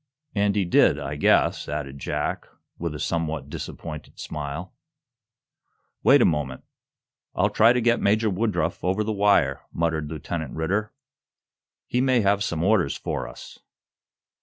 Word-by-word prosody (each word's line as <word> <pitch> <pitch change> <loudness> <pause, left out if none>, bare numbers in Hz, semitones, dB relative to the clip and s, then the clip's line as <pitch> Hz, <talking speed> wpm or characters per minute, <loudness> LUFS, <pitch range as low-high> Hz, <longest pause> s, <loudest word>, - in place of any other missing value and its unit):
And 100 -1 +1
he 100 -2 +1
did, 85 -4 +4
I 70 0 -4
guess," 75 - +2
added 70 -2 -4
Jack, - - -3 0.3
with 85 -3 -3
a - - -6
somewhat 80 0 -2
disappointed 75 -2 -7
smile. 75 +4 -5 1.3
"Wait - - +6
a - - +5
moment. 70 -5 -1 0.7
I'll - - +2
try 115 +2 +5
to 125 - +2
get 120 0 +2
Major 110 +1 +2
Woodruff 105 +3 -1
over 95 +4 +1
the 110 +1 -2
wire," 100 0 +3
muttered 80 -2 -1
Lieutenant 80 0 -5
Ridder. 95 +7 -1 0.9
"He 125 - 0
may 130 -2 +3
have 100 0 +2
some 85 -5 -2
orders 95 -8 +2
for - - -3
us." - - -12
85 Hz, 140 wpm, -25 LUFS, 75-105 Hz, 1.3 s, Wait